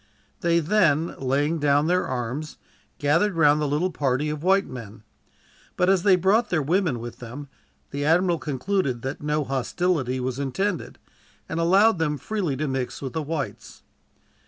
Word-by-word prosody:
They 170 0 +2
then, 165 -3 +2
laying 145 +5 0
down 145 0 +3
their 180 +2 +1
arms, 130 +4 -4 0.4
gathered 165 +7 +2
round 150 -2 +4
the 150 - 0
little 155 +6 0
party 145 0 0
of 150 -1 -5
white 195 +3 +3
men; 110 -4 -10 0.7
but 180 +1 +3
as 190 -2 +3
they 190 0 +5
brought 195 +6 +2
their 175 - +1
women 165 -4 +1
with 120 0 -8
them, 130 +4 -8 0.4
the 140 0 -3
admiral 170 +2 +3
concluded 140 -3 -2
that 135 +2 -4
no 150 0 0
hostility 135 0 -1
was 130 +1 -3
intended, 175 +8 -2 0.5
and 165 - -3
allowed 190 +4 +4
them 150 -2 0
freely 180 -7 -2
to 155 +2 -2
mix 130 -2 -3
with 135 -2 -6
the 160 - -1
whites. 150 -1 -5
150 Hz, 160 wpm, -24 LUFS, 135-180 Hz, 0.7 s, they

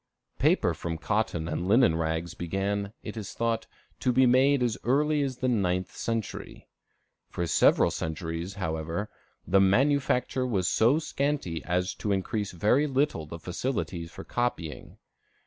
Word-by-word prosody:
Paper - - +3
from 80 -1 -4
cotton 95 -3 -1
and 85 +2 -2
linen 105 -5 +5
rags 80 +1 -2
began, 100 +3 -2
it 105 - -6
is 105 -4 -6
thought, 115 -1 -1 0.3
to 125 - +2
be 130 +2 +5
made 130 +2 +4
as 120 -2 +1
early 150 +4 +2
as 135 -3 -2
the 130 - -1
ninth 95 -6 0
century. 115 -2 -4 0.6
For 85 - -2
several - - +4
centuries, 80 +3 -4
however, 80 +2 -3 0.3
the 95 +1 +4
manufacture 130 +4 +2
was 95 -8 0
so 115 +9 +4
scanty 140 - -2
as 90 +1 0
to 105 - -3
increase 100 +2 -1
very 110 - +2
little 135 - 0
the 85 - -7
facilities 90 -2 -3
for - - -9
copying. 120 -11 -3
100 Hz, 145 wpm, -28 LUFS, 85-125 Hz, 0.6 s, linen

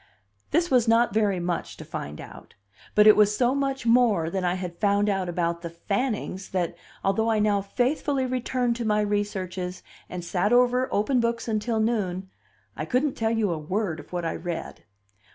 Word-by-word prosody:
This 340 +4 +1
was 245 -3 +4
not 230 -1 +4
very 205 -4 +2
much 175 -1 -3
to - - -9
find 75 +1 -6
out; - - -12 0.4
but 210 - +6
it 215 - +9
was 210 0 +4
so 250 0 +3
much 275 -2 -1
more 230 -9 +3
than 190 0 -2
I 175 0 +1
had 180 -2 -6
found 205 0 +2
out 190 -3 -1
about 170 -1 -1
the 170 - -5
Fannings 200 +2 -3
that, 175 -2 -1 0.3
although 220 +4 +1
I 220 - +2
now 210 -1 +2
faithfully 260 +6 0
returned 250 -1 -1
to 240 - -3
my 210 -1 +2
researches, 190 -3 -3 0.3
and 180 -1 -6
sat 190 +4 0
over 250 +1 +3
open 245 +6 +2
books 235 0 -1
until 220 +1 0
noon, 190 -5 -1 0.4
I - - -4
couldn't 255 - 0
tell 225 0 -1
you 225 -4 +1
a 165 - -2
word 180 +1 -2
of 145 - -13
what 175 -1 -3
I 165 - -1
read. 175 -2 -6
210 Hz, 190 wpm, -26 LUFS, 180-235 Hz, 0.4 s, it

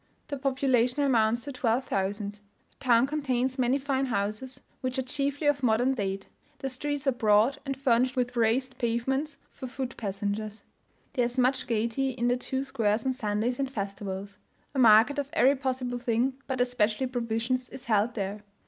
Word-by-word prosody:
The 285 - -3
population 260 -1 +1
amounts 235 -3 +2
to 285 - -5
12,000. 210 -5 -1
The 205 - -19 0.4
town 240 -2 +4
contains 265 -3 -1
many 255 +2 +3
fine 270 -1 -1
houses, 220 +4 -2 0.2
which 255 0 -3
are 265 - 0
chiefly 285 +2 -2
of 290 -1 +3
modern 245 +2 +3
date; 195 -5 -3 0.3
the 270 - -3
streets 290 +2 -3
are 270 - +4
broad, 225 +3 +3
and 275 -1 -2
furnished 255 -1 +2
with 250 -1 -1
raised 245 +3 +1
pavements 265 +5 -1
for 260 - -7
foot 260 0 -5
passengers. 205 +1 -3 0.5
There 245 -3 +2
is 240 +2 -4
much 255 +2 +2
gaiety 235 +3 0
in 240 -1 0
the 245 - +3
two 265 +1 -2
squares 220 -4 0
on 260 - +1
Sundays 230 +1 -1
and 270 -1 0
festivals. 200 -3 -5 0.3
A 275 - -1
market 230 +4 +6
of 280 -1 -3
every 280 -3 +5
possible 255 -2 -2
thing, 240 +2 +1
but 260 -2 -2
especially 245 -1 +1
provisions, 245 0 -2
is 255 - -9
held 220 +1 +2
there. 200 0 -3
250 Hz, 170 wpm, -28 LUFS, 220-265 Hz, 0.5 s, market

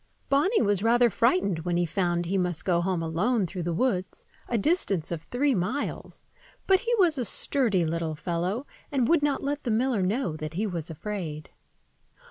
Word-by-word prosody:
Bonny 305 +11 +3
was 205 -2 +1
rather 235 +1 +4
frightened 230 - +2
when 175 +1 -1
he 175 - +2
found 175 0 0
he 185 +4 -2
must 180 -4 -1
go 175 -2 +2
home 180 -2 -1
alone 190 +7 +1
through 180 +1 -5
the 175 +1 -2
woods, 185 -1 -1 0.2
a 235 - +1
distance 200 - +1
of 165 -2 -3
three 270 - 0
miles, 225 +8 -3 0.4
but 380 -1 +4
he 475 +2 0
was 340 -8 +3
a - - 0
sturdy 220 - +1
little 160 -1 -2
fellow, 175 - -2 0.3
and 260 -5 +1
would 335 0 +4
not 290 -2 0
let 290 +1 -2
the 245 - -2
miller 230 -1 +1
know 190 - 0
that 155 0 -6
he 210 +5 0
was 170 -5 -4
afraid. 160 -3 -6
195 Hz, 185 wpm, -27 LUFS, 170-255 Hz, 0.4 s, rather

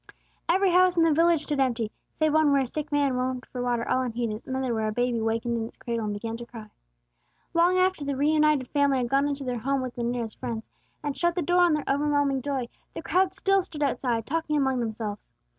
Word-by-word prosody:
Every 375 +2 +3
house 365 0 +4
in 335 - +5
the 325 -2 +4
village 330 0 +3
stood 295 -2 -1
empty, 235 -5 0 0.3
save 310 -1 +2
one 310 -2 +4
where 280 -1 +4
a - - 0
sick 300 +4 -5
man 285 -2 +2
moaned 255 0 -2
for 250 - -6
water 240 -1 -1
all 260 - +2
unheeded, 235 -3 -3
and 260 - -3
another 260 -2 -1
where 220 -1 -1
a - - -1
baby 245 +1 0
wakened 225 +1 -1
in 225 -1 -2
its - - -16
cradle 230 -2 -3
and 210 - -2
began 225 +2 -4
to 240 - -8
cry. 215 -3 -11 0.8
Long 345 +2 +4
after 370 -4 +2
the 280 -1 -2
reunited 300 -1 +2
family 285 -2 +2
had 245 -2 -1
gone 275 +2 +2
into 285 -1 -3
their 250 -2 -3
home 275 +4 0
with 255 -1 -5
their 240 - -4
nearest 235 -2 -3
friends, 225 -1 -5 0.3
and 290 -2 -2
shut 345 0 +1
the 355 - 0
door 355 0 +3
on 350 -2 +5
their 300 -1 0
overwhelming 285 -1 +1
joy, 265 -2 -2 0.3
the - - -6
crowds 375 0 +1
still 390 0 +3
stood 330 -5 -4
outside, 245 -5 0
talking 310 +1 -1
among 265 -2 +1
themselves. 220 -3 -5
270 Hz, 235 wpm, -26 LUFS, 240-305 Hz, 0.8 s, in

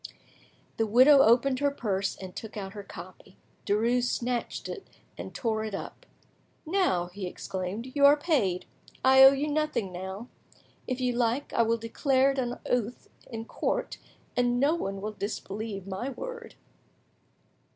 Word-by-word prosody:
The 225 - +1
widow 260 +6 +7
opened 255 +2 +4
her 285 0 +3
purse 200 -8 -2
and 185 -1 -9
took 220 -1 -7
out 195 -1 -5
her 205 - -7
copy; 185 -1 -12 0.3
Derues 235 +4 +2
snatched 245 -1 -2
it, 410 - -7 0.3
and - - -7
tore 220 -2 -1
it 215 -2 -4
up. - - -8 0.6
"Now," 325 - +1
he 195 -1 -5
exclaimed, 190 +7 -5
"you 285 - +2
are 290 +1 +6
paid; 245 - 0 0.4
I 265 0 +7
owe 270 - +11
you 280 +2 -1
nothing 300 -10 -1
now. 190 +5 -6 0.6
If 255 0 -2
you 250 -1 0
like, 240 +3 0
I - - +3
will 230 0 +2
declare 260 +4 +2
it 275 - -3
on 245 -1 -2
oath 245 -1 -2 0.2
in 225 -2 -6
court, - - -2 0.4
and 245 0 +2
no 285 +4 +3
one 195 -12 -3
will 215 +2 -3
disbelieve 205 -1 -5
my 195 +7 -4
word." 475 - -7
235 Hz, 155 wpm, -28 LUFS, 200-270 Hz, 0.6 s, owe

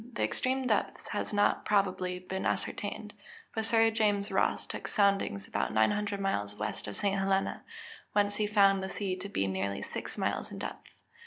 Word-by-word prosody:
_ 240 - -18
The - - 0
extreme 260 +1 +1
depth 220 -4 0
has 205 - -2
not, 205 0 +2
probably, 185 -3 +1
been 190 +1 -4
ascertained. 210 +1 -2 0.4
But 220 0 -1
Sir 225 0 +4
James 210 -2 +1
Ross - - +1
took - - -6
soundings 195 - +1
about - - -1
900 205 - +2
miles 105 - -1
west 105 0 -4
of 105 - -4
St. 200 -1 +1
Helena, 195 0 +1 0.5
whence 205 0 +2
he 210 - +1
found 200 -2 +5
the 190 - -3
sea 195 -2 -2
to 195 +2 -6
be 100 - 0
nearly 95 +1 -2
six - - -6
miles - - -1
in - - -6
depth. - - -7
200 Hz, 180 wpm, -31 LUFS, 185-210 Hz, 0.5 s, found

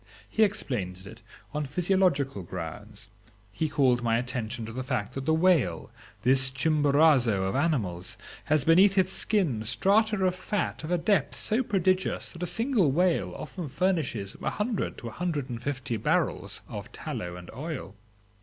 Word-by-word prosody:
He 220 - -1
explained 100 - 0
it 110 +3 -11 0.3
on 150 -1 -2
physiological 155 - +1
grounds; 95 +5 -7 0.4
he 155 +9 -2
called 130 -4 +3
my 115 -1 +2
attention 120 -1 -3
to 110 - -8
the 130 - -3
fact 130 -5 -2
that 135 0 -5
the 160 - +4
whale, 160 - +2 0.3
this 130 +1 +5
Chimborazo 140 -6 +3
of 95 0 -1
animals, 115 - -1 0.3
has 155 -3 +2
beneath 190 +4 +5
its 185 0 +3
skin 165 - 0
strata 195 - +2
of 185 - +2
fat 185 +1 -3
of 155 - -5
a 175 - +2
depth 170 -3 +1
so 220 +4 +1
prodigious 190 -5 0
that 170 - -11
a 180 - -1
single 225 - +2
whale 175 +4 +1
often 175 -5 -6
furnishes 145 - -1
a - - 0
hundred 210 0 -2
to 120 - -7
a - - -6
hundred 150 -3 -3
and 120 -1 -5
fifty 130 -3 -3
barrels 105 - -1
of - - -7
tallow 90 0 -5
and 90 -1 -10
oil. 135 - -6
140 Hz, 165 wpm, -28 LUFS, 115-180 Hz, 0.4 s, this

